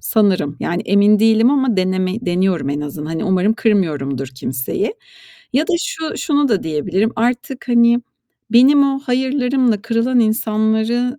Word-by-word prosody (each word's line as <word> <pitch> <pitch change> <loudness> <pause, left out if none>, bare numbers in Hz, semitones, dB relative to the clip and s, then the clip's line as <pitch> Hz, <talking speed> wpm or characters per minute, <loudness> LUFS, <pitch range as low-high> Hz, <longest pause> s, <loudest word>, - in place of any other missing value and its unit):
sanırım. 185 - 0
Yani, 175 +1 -2
emin 205 +1 +4
değilim 225 +2 +4
ama 265 -6 +1
deneme 185 0 0
deniyorum 175 -4 0
en 145 +1 -2
azından. 150 +1 -6
Hani, 165 +4 -3
umarım 190 +2 +1
kırmıyorumdur 150 - -1
kimseyi. 130 - -4 0.6
Ya 275 +5 +2
da - - -1
şu 320 -2 -4
şunu 290 -3 0
da 210 -4 0
diyebilirim: 180 +8 -1
Artık, 245 +3 -2
hani, 235 0 +4 0.5
benim 270 +4 +6
o 270 - -3
hayırlarımla 255 -3 0
kırılan 230 +2 +1
insanları 220 +3 0
220 Hz, 140 wpm, -17 LUFS, 185-250 Hz, 0.6 s, benim